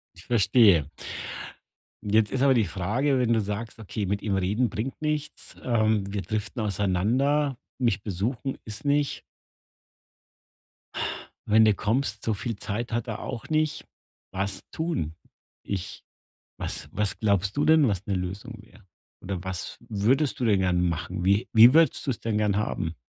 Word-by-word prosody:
Ich 85 Hz, -, -14 dB
verstehe. 100 Hz, -, +4 dB, 1.2 s
Jetzt 105 Hz, +1 st, +2 dB
ist 130 Hz, -, 0 dB
aber 135 Hz, -1 st, +5 dB
die 115 Hz, -3 st, +3 dB
Frage, 110 Hz, -, 0 dB
wenn 120 Hz, -2 st, +2 dB
du 115 Hz, -, +3 dB
sagst: 105 Hz, +3 st, -4 dB
„Okay, 105 Hz, -1 st, -4 dB
mit 100 Hz, +2 st, -1 dB
ihm 100 Hz, -2 st, 0 dB
reden 100 Hz, +6 st, +1 dB
bringt 120 Hz, +5 st, -4 dB
nichts, 150 Hz, -1 st, -3 dB
ähm, 110 Hz, -4 st, +1 dB
wir 100 Hz, -1 st, -2 dB
driften 105 Hz, +2 st, -3 dB
auseinander, 110 Hz, +9 st, +1 dB, 0.2 s
mich 115 Hz, -6 st, +1 dB
besuchen 115 Hz, +8 st, -3 dB
ist 105 Hz, +2 st, -7 dB
nicht“ 145 Hz, 0 st, +1 dB, 2.3 s
wenn 110 Hz, +1 st, +6 dB
du 110 Hz, -1 st, +5 dB
kommst, 110 Hz, +2 st, -1 dB
so 110 Hz, -, +1 dB
viel 115 Hz, +2 st, -4 dB
Zeit 110 Hz, +5 st, -4 dB
hat 120 Hz, +2 st, -1 dB
er 110 Hz, -, -4 dB
auch 115 Hz, -, -6 dB
nicht. 155 Hz, -1 st, 0 dB, 0.5 s
Was 100 Hz, +1 st, -2 dB
tun? 160 Hz, -, -2 dB, 0.5 s
Ich 95 Hz, -3 st, -5 dB, 0.5 s
was -, -, -5 dB
was 105 Hz, -1 st, -1 dB
glaubst 100 Hz, -1 st, +1 dB
du 145 Hz, -, +2 dB
denn, 155 Hz, -3 st, +6 dB
was 100 Hz, -2 st, -1 dB
'ne 100 Hz, -, 0 dB
Lösung 100 Hz, +6 st, -5 dB
wäre? 105 Hz, -3 st, -20 dB, 0.4 s
Oder 90 Hz, -2 st, -4 dB
was 95 Hz, -2 st, -5 dB
würdest 120 Hz, +8 st, +1 dB
du 125 Hz, -, 0 dB
denn 105 Hz, -4 st, +4 dB
gern 90 Hz, -1 st, +2 dB
machen? 85 Hz, +2 st, -3 dB
Wie 100 Hz, +5 st, +3 dB
wie 115 Hz, +3 st, +9 dB
würdest 165 Hz, +1 st, +4 dB
du -, -, +3 dB
es 115 Hz, -, -5 dB
denn 110 Hz, -2 st, -1 dB
gern 105 Hz, -2 st, +1 dB
haben? 85 Hz, -5 st, -2 dB
110 Hz, 160 wpm, -26 LUFS, 100-125 Hz, 2.3 s, wie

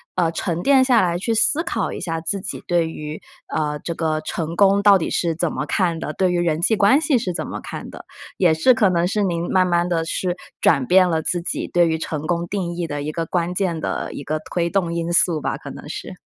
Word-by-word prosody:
呃， 175 Hz, -3 st, +2 dB
沉 170 Hz, -1 st, -2 dB
淀 275 Hz, -2 st, +5 dB
下 250 Hz, -3 st, +4 dB
来 175 Hz, -2 st, +1 dB
去 225 Hz, +6 st, -1 dB
思 290 Hz, +8 st, +3 dB
考 235 Hz, -, -2 dB
一 -, -, -6 dB
下 165 Hz, -2 st, -2 dB
自 190 Hz, +4 st, -2 dB
己 190 Hz, -, -5 dB
对 170 Hz, -2 st, +1 dB
于， 155 Hz, -1 st, -7 dB, 0.3 s
呃， 150 Hz, -1 st, -2 dB
这 170 Hz, +3 st, -5 dB
个 155 Hz, -1 st, -1 dB
成 160 Hz, +1 st, -4 dB
功 200 Hz, 0 st, +4 dB
到 200 Hz, -1 st, +7 dB
底 170 Hz, -, -3 dB
是 170 Hz, -2 st, 0 dB
怎 170 Hz, +1 st, -1 dB
么 150 Hz, -, -3 dB
看 170 Hz, +1 st, 0 dB
的， 160 Hz, -, -4 dB
对 185 Hz, +4 st, +1 dB
于 175 Hz, -, +1 dB
人 160 Hz, -2 st, 0 dB
际 200 Hz, +6 st, +2 dB
关 215 Hz, +7 st, +4 dB
系 305 Hz, -4 st, +2 dB
是 205 Hz, -6 st, -2 dB
怎 -, -, -4 dB
么 -, -, -6 dB
看 -, -, -7 dB
的， -, -, -10 dB, 0.3 s
也 175 Hz, -4 st, +3 dB
是 160 Hz, +11 st, +4 dB
可 225 Hz, -6 st, +3 dB
能 175 Hz, -1 st, +1 dB
是 210 Hz, +2 st, 0 dB
您 175 Hz, -2 st, -1 dB
慢 185 Hz, -1 st, +3 dB
慢 175 Hz, -1 st, +1 dB
地 170 Hz, -2 st, 0 dB
去 175 Hz, +2 st, -2 dB, 0.2 s
转 140 Hz, -5 st, +3 dB
变 185 Hz, +4 st, +5 dB
了 160 Hz, -2 st, 0 dB
自 175 Hz, +2 st, -1 dB
己 170 Hz, -, -3 dB
对 175 Hz, -1 st, +3 dB
于 160 Hz, 0 st, 0 dB
成 155 Hz, -1 st, -4 dB
功 170 Hz, 0 st, 0 dB
定 185 Hz, -4 st, -2 dB
义 175 Hz, 0 st, -2 dB
的 145 Hz, -2 st, -4 dB
一 150 Hz, +2 st, -4 dB
个 165 Hz, +1 st, -2 dB
关 175 Hz, +1 st, -1 dB
键 180 Hz, -3 st, -1 dB
的 -, -, -3 dB
一 -, -, -7 dB
个 155 Hz, +1 st, -2 dB
推 170 Hz, -1 st, 0 dB
动 175 Hz, -3 st, 0 dB
因 170 Hz, 0 st, -2 dB
素 170 Hz, -2 st, +3 dB
吧， -, -, -2 dB
可 -, -, -9 dB
能 -, -, -10 dB
是。 -, -, -7 dB
175 Hz, 270 characters per minute, -21 LUFS, 165-190 Hz, 0.3 s, 到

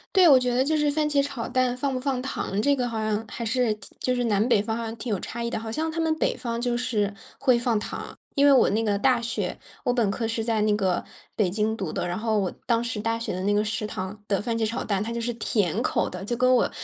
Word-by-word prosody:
对， 370 Hz, -2 st, +7 dB
我 280 Hz, -4 st, +8 dB
觉 250 Hz, -1 st, +1 dB
得 250 Hz, -, +3 dB
就 310 Hz, +4 st, +2 dB
是 295 Hz, -1 st, +2 dB
番 300 Hz, 0 st, +1 dB
茄 285 Hz, -1 st, +3 dB
炒 270 Hz, -5 st, -4 dB
蛋 255 Hz, -1 st, +1 dB
放 270 Hz, +2 st, -1 dB
不 -, -, -1 dB
放 260 Hz, -1 st, -1 dB
糖， 210 Hz, -6 st, -2 dB
这 285 Hz, +4 st, +3 dB
个 250 Hz, -2 st, -1 dB
好 230 Hz, -2 st, -3 dB
像 215 Hz, 0 st, -1 dB
还 235 Hz, -, -5 dB
是 235 Hz, 0 st, +2 dB
挺 210 Hz, -, -14 dB
就 255 Hz, -, +1 dB
是 245 Hz, -1 st, 0 dB
南 210 Hz, -1 st, +2 dB
北 210 Hz, -, +4 dB
方 220 Hz, +2 st, -2 dB
好 230 Hz, -, -3 dB
像 225 Hz, 0 st, -4 dB
挺 235 Hz, -, -5 dB
有 205 Hz, -, +1 dB
差 235 Hz, -, -5 dB
异 235 Hz, -, -1 dB
的。 -, -, -2 dB
好 220 Hz, 0 st, -5 dB
像 315 Hz, +7 st, -1 dB
他 330 Hz, +1 st, -2 dB
们 320 Hz, -1 st, +2 dB
北 -, -, +1 dB
方 235 Hz, -3 st, -3 dB
就 240 Hz, 0 st, 0 dB
是， 210 Hz, -4 st, 0 dB, 0.3 s
会 255 Hz, -3 st, +4 dB
放 235 Hz, -2 st, +1 dB
糖。 210 Hz, -, -6 dB, 0.2 s
因 280 Hz, 0 st, +4 dB
为 285 Hz, -, +7 dB
我 265 Hz, -, +6 dB
那 220 Hz, +2 st, +1 dB
个 205 Hz, -2 st, +1 dB
大 250 Hz, +2 st, +3 dB
学， 225 Hz, -5 st, -3 dB, 0.3 s
我 245 Hz, -, +2 dB
本 235 Hz, -5 st, +2 dB
科 225 Hz, +1 st, -2 dB
是 225 Hz, 0 st, -2 dB
在 225 Hz, -2 st, +1 dB
那 210 Hz, -1 st, +3 dB
个， 190 Hz, -4 st, +1 dB, 0.3 s
北 205 Hz, -4 st, +2 dB
京 215 Hz, +3 st, 0 dB
读 185 Hz, -6 st, -4 dB
的， -, -, -2 dB
然 175 Hz, +1 st, -2 dB
后 220 Hz, -1 st, +1 dB
我 190 Hz, -2 st, -1 dB
当 235 Hz, -1 st, +2 dB
时 230 Hz, -3 st, -3 dB
大 225 Hz, +2 st, 0 dB
学 230 Hz, -, -3 dB
的 185 Hz, -, -3 dB
那 205 Hz, -, +2 dB
个 205 Hz, +1 st, +3 dB
食 215 Hz, 0 st, -2 dB
堂 190 Hz, 0 st, -5 dB
的 200 Hz, -2 st, +1 dB
番 230 Hz, +1 st, -1 dB
茄 225 Hz, -, +1 dB
炒 230 Hz, +4 st, -3 dB
蛋， 200 Hz, -2 st, 0 dB
它 230 Hz, -, -4 dB
就 235 Hz, -, -2 dB
是 240 Hz, +1 st, -1 dB
甜 210 Hz, -3 st, 0 dB
口 -, -, 0 dB
的， -, -, -7 dB
就 240 Hz, -, -1 dB
跟 255 Hz, +1 st, +4 dB
我， 245 Hz, -, +3 dB
230 Hz, 315 characters per minute, -25 LUFS, 210-250 Hz, 0.3 s, 我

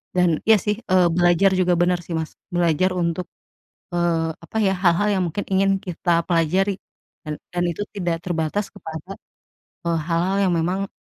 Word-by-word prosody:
Dan, 175 Hz, -3 st, +2 dB
iya 220 Hz, -, +8 dB
sih, 210 Hz, +1 st, -1 dB
eee, 185 Hz, -5 st, +4 dB
belajar 175 Hz, +3 st, +4 dB
juga 180 Hz, -1 st, +2 dB
bener 175 Hz, 0 st, +2 dB
sih, 170 Hz, -, -6 dB
Mas. 160 Hz, -1 st, -4 dB, 0.2 s
Belajar 175 Hz, +1 st, +2 dB
untuk, 175 Hz, 0 st, -1 dB, 0.7 s
eee, 165 Hz, -2 st, +1 dB
apa 170 Hz, -, -9 dB
ya, 195 Hz, -2 st, +3 dB
hal-hal 180 Hz, +2 st, +2 dB
yang -, -, +1 dB
mungkin 170 Hz, +5 st, -3 dB
ingin 195 Hz, +1 st, +3 dB
kita 175 Hz, -1 st, 0 dB
pelajari. 180 Hz, +4 st, +2 dB, 0.5 s
Dan 150 Hz, -1 st, -4 dB, 0.2 s
dan 175 Hz, 0 st, 0 dB
itu 170 Hz, -, -6 dB, 0.2 s
tidak 175 Hz, -4 st, -1 dB
terbatas 175 Hz, +3 st, -1 dB
kepada, 160 Hz, +5 st, -8 dB, 0.7 s
eee, 170 Hz, -1 st, +1 dB
hal-hal 180 Hz, +3 st, +1 dB
yang -, -, +1 dB
memang, 185 Hz, +4 st, -1 dB
175 Hz, 165 wpm, -22 LUFS, 165-190 Hz, 0.7 s, iya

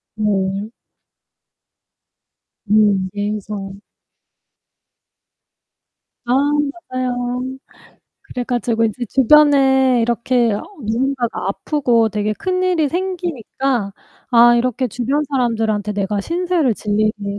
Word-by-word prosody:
네. 200 Hz, -1 st, -1 dB, 2.0 s
음 205 Hz, -3 st, +3 dB
예의상. 205 Hz, -1 st, -4 dB, 2.5 s
아 240 Hz, -, -2 dB, 0.6 s
맞아요. 250 Hz, -1 st, -2 dB, 0.8 s
그래 250 Hz, -, -5 dB
가지고 235 Hz, -2 st, 0 dB
이제 225 Hz, +3 st, -2 dB
주변에 265 Hz, -2 st, +4 dB
이렇게 235 Hz, 0 st, +1 dB
어 205 Hz, -, -3 dB, 0.2 s
누군가가 235 Hz, -2 st, -1 dB
아프고 235 Hz, 0 st, +1 dB
되게 210 Hz, 0 st, -1 dB
큰일이 365 Hz, -, 0 dB
생기니까 275 Hz, -, -2 dB, 0.4 s
'아, 240 Hz, 0 st, +6 dB
이렇게 250 Hz, +1 st, 0 dB
주변 250 Hz, +6 st, -1 dB
사람들한테 225 Hz, -5 st, 0 dB
내가 200 Hz, 0 st, -1 dB
신세를 340 Hz, -, 0 dB
질 205 Hz, 0 st, -2 dB
일이 210 Hz, -2 st, -1 dB
235 Hz, 200 characters per minute, -18 LUFS, 210-265 Hz, 2.5 s, 아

